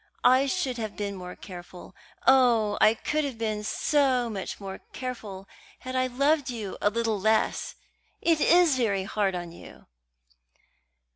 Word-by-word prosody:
I 260 +2 +5
should 270 -5 -1
have 215 -2 -4
been 205 -1 -3
more 180 -1 -8
careful 180 -1 -11 0.3
oh, 240 -5 +4
I 215 - +6
could 305 +6 -1
have 275 -5 -4
been 215 -2 -2
so 255 0 +1
much 195 -3 -5
more 195 -1 -7
careful 215 -7 -6 0.3
had 255 0 -6
I 255 0 +2
loved 280 +3 +1
you 220 -6 -5
a 205 - +4
little 225 -1 -1
less! 220 +2 +1 0.4
It 330 -3 +2
is 340 -5 +5
very 200 -6 +1
hard 195 -1 -1
on 175 -1 -5
you." 170 - -14
225 Hz, 150 wpm, -27 LUFS, 200-260 Hz, 0.4 s, I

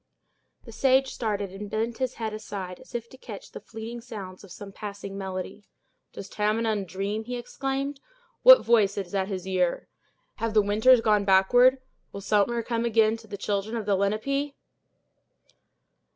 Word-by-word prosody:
The 230 - -10
sage 265 +3 +2
started, 205 -5 -2
and 200 +2 -7
bent 225 +3 -2
his 260 -1 -1
head 220 -2 -4
aside, 195 -4 -6
as - - -14
if 235 -1 -3
to 260 - -15
catch - - -10
the - - -8
fleeting 230 +2 -8
sounds 205 -7 -9
of 195 - -14
some 200 +2 -9
passing 200 -1 -7
melody. 190 +1 -6 0.4
"Does 195 - -8
Tamenund 215 0 0
dream!" 200 +4 -3
he 245 +1 -4
exclaimed. 270 +3 -3 0.4
"What - - +9
voice 210 -4 +3
is 195 -2 -5
at 190 -1 0
his 190 -3 -5
ear! 180 -2 0 0.5
Have 225 -1 -2
the 210 - +6
winters 220 +5 +5
gone 210 -2 +3
backward! 245 +7 +5 0.3
Will 200 - -7
summer 210 +4 +1
come 230 0 -1
again 225 -1 +3
to 225 -1 -16
the 200 -1 -6
children 205 +3 -2
of 220 - -4
the 205 -1 +2
Lenape!" 275 +9 -1
215 Hz, 165 wpm, -26 LUFS, 200-235 Hz, 0.5 s, What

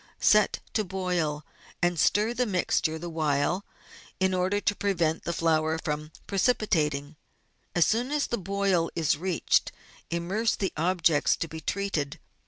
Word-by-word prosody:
Set - - +4
to 215 - +1
boil, 180 -6 -2 0.3
and 175 -2 +1
stir 210 +9 +3
the 245 0 0
mixture 175 -4 0
the 170 +2 -6
while, 155 +2 0 0.6
in 190 0 +2
order 185 +3 +1
to 205 - +1
prevent 170 -6 0
the - - -1
flour 160 -1 +1
from 155 -1 -4
precipitating; 160 - +1 0.6
as 175 -3 +5
soon 240 - 0
as 295 -1 +1
the - - -1
boil 195 -3 +1
is 160 -3 +2
reached, 175 +2 +1 0.4
immerse 185 +7 0
the 195 - -2
objects 165 -2 +2
to 165 - -3
be 160 0 -8
treated. 165 -5 -2
175 Hz, 145 wpm, -27 LUFS, 155-200 Hz, 0.6 s, as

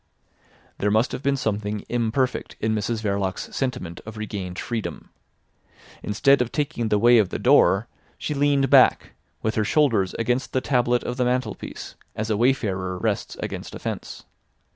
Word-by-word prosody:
There 105 - +1
must 110 +4 +2
have - - -4
been 140 0 +1
something 105 -3 -2
imperfect 120 +2 -1
in 110 +1 0
Mrs 110 +1 -2
Verloc's 100 -2 -2
sentiment 110 -10 -3
of 110 0 -9
regained 100 -4 -5
freedom. 115 -3 -5 0.9
Instead 130 +6 +3
of 125 - -1
taking 130 -6 -1
the 105 - +3
way 120 +2 +6
of 100 -4 +2
the - - -3
door - - +4 0.3
she - - -3
leaned 140 -1 +2
back, 135 -2 +5 0.3
with 110 - 0
her 110 - +1
shoulders 115 -6 +2
against 125 +3 -1
the 130 - +2
tablet 125 -3 +1
of 125 - -4
the 125 - +1
mantelpiece, 125 +1 -3 0.2
as 110 +1 -2
a - - +2
wayfarer 100 -7 0
rests - - -2
against - - -5
a - - -7
fence. - - -6
115 Hz, 165 wpm, -24 LUFS, 105-130 Hz, 0.9 s, way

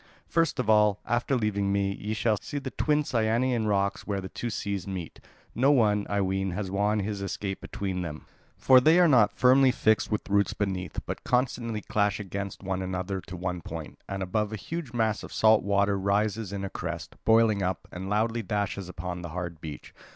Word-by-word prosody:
"First 165 -3 +1
of 125 -5 -1
all, 105 -2 +4
after 120 +4 0
leaving 100 -4 0
me, 100 -1 +1
ye 105 +2 -4
will 110 -2 +4
see 145 - -5
the 135 -2 -4
twin 150 -1 +1
Cyanean 115 -1 +1
rocks 100 -1 0
where 100 -2 -1
the 95 -1 -6
two 120 - -4
seas 100 -3 -3
meet. 95 -4 -6 0.3
No 130 +4 +3
one, 105 -6 +3
I 100 0 +1
ween, 95 0 0
has 95 -1 -3
won 105 +2 +1
his 100 0 -3
escape 100 0 -4
between 95 -2 -4
them. 80 -3 -6 0.3
For 130 -1 +6
they 155 +6 +5
are 175 - +6
not 120 -8 +4
firmly 130 +1 +6
fixed 110 -3 +2
with 105 - -1
roots 100 0 +2
beneath, 95 -4 -3
but - - -5
constantly 120 -3 0
clash 105 -1 0
against 100 0 -5
one 95 0 -2
another 95 +1 -3
to 90 - -7
one 90 0 -3
point, 80 -2 -8
and 95 -1 -3
above 105 +3 -1
a - - -3
huge 160 - -5
mass 110 -3 0
of - - -9
salt 110 0 +5
water 100 0 +1
rises 105 +1 0
in 100 -1 -4
a - - -4
crest, 85 -1 -5
boiling 110 -2 +4
up, 95 0 -2
and 95 +2 -6
loudly 115 +3 +1
dashes 100 -2 -2
upon 90 +1 -5
the 85 - -6
hard 85 -1 -5
beach. 75 -2 -8
100 Hz, 200 wpm, -27 LUFS, 95-110 Hz, 0.3 s, For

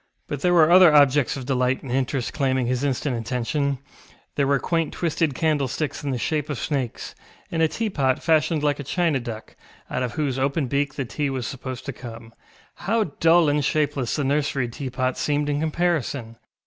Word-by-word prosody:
But 145 -2 -4
there 175 +2 +3
were 165 -1 +6
other 180 -2 +8
objects 145 -2 +4
of 130 - -6
delight 125 0 0
and 130 - -7
interest 130 -1 -1
claiming 130 -3 +1
his 125 +2 -1
instant 140 -1 -1
attention: 125 +4 -1 0.6
there 140 -1 +1
were 140 0 +3
quaint 165 +2 -1
twisted 165 -4 0
candlesticks 150 -1 -1
in 145 - -2
the 130 - -1
shape 150 +4 -1
of 145 - -2
snakes, 135 -5 -3 0.4
and 165 - 0
a 160 - +5
teapot 155 - -1
fashioned 160 -1 +2
like 145 -1 +1
a - - -4
china 165 0 0
duck, 115 -2 -8 0.4
out - - -1
of 125 -2 -2
whose 140 -4 -1
open 140 +2 0
beak 140 +2 -1
the 135 - -2
tea 145 +4 -2
was 130 -3 -3
supposed 130 -1 -6
to 135 - -4
come. 115 -2 -10 0.4
How 210 -4 -1
dull 165 0 +5
and 145 0 +2
shapeless 140 -4 0
the 145 - -1
nursery 140 -2 0
teapot 130 0 -3
seemed 145 0 0
in 145 0 0
comparison! 155 -7 -1
140 Hz, 185 wpm, -23 LUFS, 130-155 Hz, 0.6 s, other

